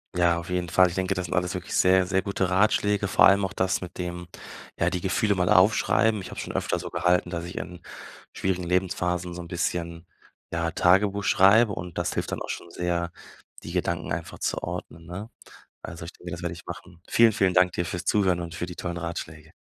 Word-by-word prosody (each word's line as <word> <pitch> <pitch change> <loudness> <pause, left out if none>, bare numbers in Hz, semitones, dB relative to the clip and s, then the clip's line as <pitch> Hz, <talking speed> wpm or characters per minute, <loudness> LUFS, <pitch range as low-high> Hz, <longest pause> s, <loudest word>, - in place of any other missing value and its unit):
Ja, 85 -1 +3
auf 85 +1 -7
jeden 90 -1 -1
Fall. 90 +2 +4
Ich 85 - -7
denke, 95 0 0
das 90 -1 -3
sind 85 - -4
alles 90 0 0
wirklich 90 -1 -6
sehr, 95 0 +4
sehr 95 +1 +1
gute 95 -2 -1
Ratschläge, 105 +1 +2
vor - - +6
allem 100 0 +4
auch 95 - -5
das 95 -1 0
mit 90 - -9
dem, 90 -1 -5 0.5
ja, - - +2
die 90 - -2
Gefühle 100 +3 +1
mal 90 -1 +1
aufschreiben. 110 +3 +4
Ich 95 - -8
habe - - -7
schon - - -5
öfter - - -1
so - - -6
gehalten, 90 0 +1
dass 85 -1 -4
ich 90 - -8
in 90 -1 -6 0.5
schwierigen 95 -1 -1
Lebensphasen 90 0 -1
so 90 - -6
'n 85 - -9
bisschen, 85 -1 -3 0.5
ja, 85 0 -1
Tagebuch 95 +4 +3
schreibe 105 +4 +5
und 90 -3 -6
das 85 0 -1
hilft - - -3
dann - - -4
auch - - -6
schon 85 - -5
sehr, 85 -1 -2 0.5
die - - -7
Gedanken - - -2
einfach 80 0 -4
zu - - -1
ordnen, 80 +1 -6
ne? 95 +6 -7 0.5
Also, 85 0 -8
ich 85 - -7
denke, 90 - -10
das 85 - -6
werde 85 -1 -3
ich 85 - -13
machen. 85 -2 -10
Vielen, 115 -1 +6
vielen 100 -3 +2
Dank 90 0 +4
dir 85 -1 -2
fürs 90 +1 -4
Zuhören 95 -4 +2
und 85 -1 -6
für 85 - -3
die 90 - -9
tollen 85 -1 -4
Ratschläge. 80 -2 -6
90 Hz, 225 wpm, -26 LUFS, 85-95 Hz, 0.5 s, vor